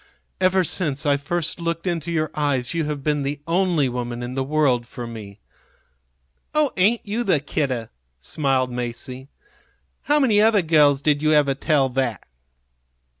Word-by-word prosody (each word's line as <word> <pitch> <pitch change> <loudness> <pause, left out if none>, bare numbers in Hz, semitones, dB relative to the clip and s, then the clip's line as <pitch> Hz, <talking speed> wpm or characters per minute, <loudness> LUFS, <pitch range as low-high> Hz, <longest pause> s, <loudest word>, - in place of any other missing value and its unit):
Ever 185 0 +3
since 150 -4 -2
I 145 -1 +3
first 165 +4 -2
looked 170 0 -3
into 170 -2 -2
your 155 -2 -1
eyes 140 -4 0
you 165 -2 -1
have 150 -2 -4
been 150 0 0
the 140 +1 -3
only 170 -4 +1
woman 120 -1 -4
in 120 +1 -5
the 135 0 -1
world 135 -4 +1
for 120 0 -7
me." 110 -3 -9 1.2
"Oh, 300 -2 +3
ain't 210 +6 +2
you 220 +4 -2
the 185 -9 +2
kidder!" 135 -5 -2 0.3
smiled 130 - -1
Masie. 125 +2 -5 0.8
"How 295 +1 +3
many 220 -7 +4
other 215 -3 +4
girls 145 -3 +4
did 150 -1 +2
you 155 0 +3
ever 145 -2 +3
tell 140 0 +1
that?" 125 -5 -2
145 Hz, 160 wpm, -22 LUFS, 130-170 Hz, 1.2 s, many